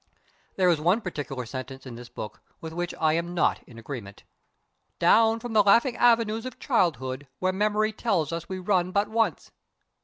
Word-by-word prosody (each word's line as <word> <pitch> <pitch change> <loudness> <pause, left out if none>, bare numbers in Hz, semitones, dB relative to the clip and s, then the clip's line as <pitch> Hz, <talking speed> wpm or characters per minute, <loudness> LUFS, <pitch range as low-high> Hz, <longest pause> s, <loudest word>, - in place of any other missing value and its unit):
There 185 -1 +3
is 165 -3 +2
one 180 +8 +3
particular 145 - -5
sentence 130 +2 -7
in 130 - -8
this 120 +1 -10
book 105 - -8 0.2
with 160 -1 -7
which 175 +1 -3
I 155 -1 +3
am 170 +2 -2
not 170 - +2
in 115 - -14
agreement. 115 -5 -8 0.4
"... - - -48 0.3
down 225 0 +4
the 225 -2 +2
laughing 230 +5 +4
avenues 230 -1 +3
of 255 - -9
childhood, 145 - 0
where 185 0 0
memory 215 +2 +1
tells 175 -10 0
us 170 0 -5
we 190 - -3
run 185 -1 +1
but 200 +2 +1
once...." 220 - 0
180 Hz, 180 wpm, -26 LUFS, 145-215 Hz, 0.4 s, down